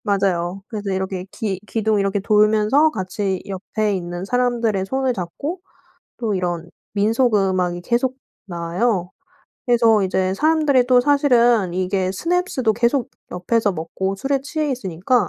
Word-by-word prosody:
맞아요. 195 -2 0
그래서 210 -3 -4
이렇게 190 -1 -3
기 200 -4 -3
기둥 220 -1 0
이렇게 195 0 0
돌면서 215 +8 +3
같이 190 -3 -3
옆에 205 +2 -2
있는 175 0 -4
사람들의 235 -4 0
손을 265 +2 0
잡고 275 - -5 0.6
또 225 -4 -1
이런 175 -2 -3 0.2
민속 225 +4 +2
음악이 185 -3 +1
계속 245 +6 0 0.3
나와요. 180 +2 -1 0.6
그래서 230 -3 +4
이제 190 0 0
사람들이 300 -2 +3
또 250 -1 +5
사실은 245 - +3
이게 185 0 0
스냅스도 335 - 0
계속 240 +3 0 0.2
옆에서 205 +4 0
먹고 190 +4 -3
술에 270 +6 -1
취해 300 +1 -2
있으니까 200 -2 0
210 Hz, 310 characters per minute, -21 LUFS, 185-245 Hz, 0.6 s, 또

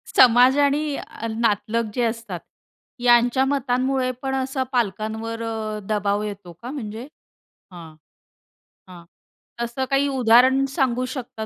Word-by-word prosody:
समाज 250 +2 +6
आणि 285 +1 +1 0.4
नातलग 230 0 0
जे 245 - -1
असतात, 225 -5 -3 0.6
यांच्या 240 +2 +4
मतांमुळे 260 -1 0
पण 265 -1 -2
असा 265 0 -1
पालकांवर 220 0 -2
अ, 220 -1 -4
दबाव 205 -1 0
येतो 200 -4 -7
का 245 - -5
म्हणजे? 230 -3 -6 0.6
हां. 165 -3 -11 0.9
हां. 175 -2 -12 0.6
तसं 235 +3 -2
काही 275 0 +2
उदाहरण 260 +1 +4
सांगू 255 -4 +1
शकता 245 -4 -6
240 Hz, 115 wpm, -22 LUFS, 220-265 Hz, 0.9 s, समाज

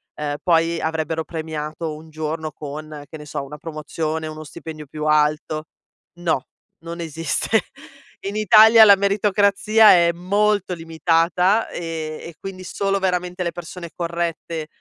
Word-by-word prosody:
ehm, 145 -1 -3
poi 165 -1 +2
avrebbero 160 0 -2
premiato 155 -1 -5
un 160 +1 -13
giorno 155 0 -4
con, 150 0 -8
che 160 - -8
ne 150 - -11
so, 145 -1 -4
una 150 +2 -9
promozione, 155 0 -4
o 155 - -6
uno 155 0 -8
stipendio 155 +1 -9
più 150 +2 -6
alto. 155 +1 +1 0.5
No, 160 -6 -1 0.3
non 170 +1 -8
esiste. 165 -1 0 0.7
In 200 - -4
Italia 220 +2 +8
la 200 -2 +9
meritocrazia 205 +2 +4
è 170 -1 +5
molto 200 +2 +1
limitata, 165 +5 +1
e 160 -2 -5
e 170 -2 -9
quindi 190 -1 -8
solo 195 +1 -1
veramente 180 -1 -1
le 170 - -1
persone 170 0 -8
corrette 170 -2 -3
165 Hz, 140 wpm, -21 LUFS, 155-180 Hz, 0.7 s, la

